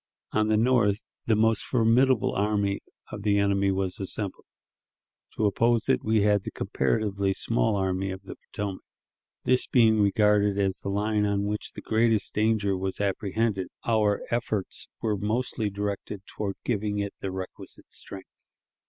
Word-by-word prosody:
On 110 0 +2
the 110 0 +3
north, 110 -3 +2 0.2
the 110 - +4
most 110 0 +3
formidable 125 +1 +3
army 100 -1 0 0.3
of 105 - -6
the 100 0 +2
enemy 100 -1 +2
was 95 -1 -2
assembled; 100 0 -5 0.9
to 110 - +1
oppose 115 +3 +2
it - - +2
we 110 -1 +2
had 105 -1 +3
the - - -4
comparatively 100 +5 0
small 115 +1 +1
Army 95 0 -1
of 95 +1 -6
the - - -8
Potomac. 100 -2 -4 0.6
This 125 0 +2
being 110 -3 +4
regarded 105 -1 +3
as 95 -1 0
the - - -5
line 105 +1 +1
on 100 0 0
which 105 +1 -3
the - - -8
greatest 110 -1 +1
danger 105 -2 +2
was 95 0 -3
apprehended, 100 0 0 0.2
our 105 -3 +2
efforts 110 -5 -2 0.2
were 105 -2 +1
mostly 110 +1 -1
directed 100 0 -4
toward 100 -2 -4
giving 105 -3 -1
it 100 -1 -2
the 95 - -3
requisite 95 0 -7
strength. 95 -1 -8
105 Hz, 155 wpm, -27 LUFS, 100-110 Hz, 0.9 s, the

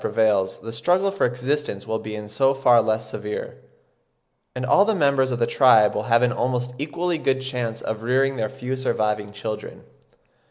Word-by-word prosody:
prevails 100 -4 +1
the 115 - -7
struggle 180 +12 +1
for 195 - +1
existence 125 -3 -3
will 110 0 -2
be 110 -1 -7
in 105 0 -7
so 135 +6 +1
far 125 -3 +5
less 110 0 -1
severe, 105 0 -6 1.0
and 125 0 -3
all 185 +9 +5
the 220 +1 +1
members 140 -5 +2
of 125 - -2
the 120 - +1
tribe 115 -5 +5
will - - -1
have 115 +1 +4
an 125 - +3
almost 125 0 -2
equally 170 +3 -2
good 135 -3 0
chance 125 -4 -4
of 110 0 -4
rearing 135 +3 +1
their 110 -3 -2
few 130 -1 -5
surviving 105 -5 -1
children. 105 +1 -7
125 Hz, 185 wpm, -23 LUFS, 110-135 Hz, 1.0 s, far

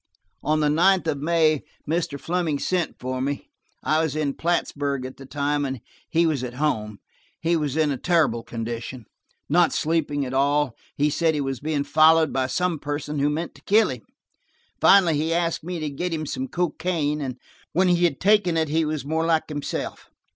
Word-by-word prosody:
On 155 0 +1
the 150 - +3
ninth 180 +4 +4
of 155 -3 -1
May, 155 -2 +3 0.3
Mr. 165 -2 -1
Fleming 165 -3 -1
sent 180 +3 -1
for 130 0 -3
me. 140 +1 -3 0.3
I 155 +1 +2
was 160 -3 -1
in 150 -3 0
Plattsburg 145 -5 -1
at 130 - -8
the 135 - -11
time, 145 +1 -1
and 135 -2 -3 0.3
he 165 +1 +3
was 150 -6 0
at 125 -1 -5
home. 110 -8 -1 0.4
He 170 +1 +1
was 150 -2 -1
in 155 -2 +2
a 135 - -2
terrible 155 -8 +2
condition–not 120 - -2
sleeping 150 -3 0
at 130 - -5
all, 140 +2 +3
and - - -20 0.2
he 150 +1 +2
said 160 +1 +1
he - - -1
was 135 -2 -3
being 150 -1 -1
followed 160 +1 +4
by 130 -1 +1
some 180 +2 -1
person 145 0 -3
who 145 +1 +2
meant 160 +3 -3
to - - -18
kill 215 +2 +4
him. 125 -3 -7 0.8
Finally 180 -6 +6
he 160 +2 0
asked 170 -2 0
me 175 0 -4
to 155 -1 -2
get 175 +6 -3
him 155 -1 -2
some 260 - -3
cocaine, 170 - -1
and 130 -3 -4 0.4
when 185 +4 +3
he 175 -1 +3
had 140 -6 0
taken 195 -4 +3
it 160 -2 +1
he 160 +2 +2
was 155 -2 -3
more 160 +2 0
like 160 -1 +1
himself. 145 -1 -5
155 Hz, 195 wpm, -24 LUFS, 140-165 Hz, 0.8 s, Finally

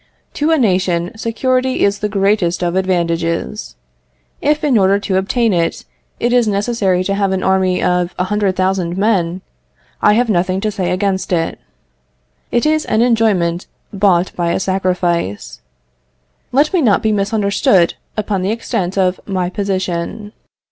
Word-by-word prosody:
To 300 +2 0
a 325 - +3
nation, 185 - 0
security 255 +3 0
is 200 0 0
the 210 - -2
greatest 195 -3 +1
of 175 0 -1
advantages. 170 - -1 0.7
If, 300 +1 +1
in 285 -4 +2
order 195 -1 +4
to 195 -2 -1
obtain 220 +3 +1
it, 170 -1 -1 0.3
it 240 +1 0
is 245 -2 +3
necessary 200 -3 0
to 195 - -1
have 200 -1 0
an 190 -1 -1
army 190 -1 +1
of 180 0 0
a 180 - 0
hundred 200 0 0
thousand 185 -2 -1
men, 190 -4 0 0.6
I 210 - +5
have 240 +3 +2
nothing 185 -2 0
to 215 0 -1
say 190 -4 -2
against 190 0 -1
it. 165 -2 -1 0.9
It 240 +3 0
is 310 0 +1
an 220 +2 +2
enjoyment 205 -8 +1 0.3
bought 190 -3 +2
by 170 -1 0
a - - 0
sacrifice. 180 - -2 0.9
Let 290 +6 +2
me 360 - +3
not 225 -4 +2
be 220 - +2
misunderstood 200 -3 +2 0.2
upon 205 -3 -1
the 185 - -1
extent 215 -4 -2
of 185 -1 +1
my 185 -2 -2
position. 190 +1 -3
195 Hz, 155 wpm, -16 LUFS, 180-215 Hz, 0.9 s, I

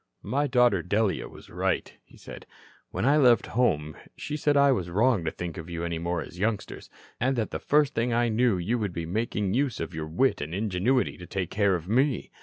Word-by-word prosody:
"My 140 +8 0
daughter 125 -7 +3
Delia 100 +3 0
was - - -15
right," - - -1
he - - -20
said. - - -11 0.4
"When 95 +5 -2
I 145 +3 +4
left 125 -5 +5
home 75 -11 +1 0.2
she 150 - -5
said 145 -1 +1
I 140 0 +5
was 90 -9 -1
wrong 105 +1 +2
to - - +1
think 85 0 -6
of 80 +1 -9
you 85 0 -4
any 85 -1 -2
more 85 0 -2
as 90 - -12
youngsters, 105 0 -3 0.3
and 130 +3 +1
that 115 -3 -2
the - - -3
first 145 -1 +2
thing 115 +2 0
I 120 +1 +2
knew 115 -2 +2
you 105 +8 -1
would 100 -5 -2
be 85 -1 -4
making 105 +1 -2
use 130 -1 0
of 80 +1 -5
your 80 -1 -4
wit 90 - +1
and 75 +4 -4
ingenuity 105 +6 0
to 90 - -9
take 95 -3 -3
care 100 -2 +2
of 85 -1 -6
me. 130 +6 +1
105 Hz, 220 wpm, -27 LUFS, 90-125 Hz, 0.4 s, left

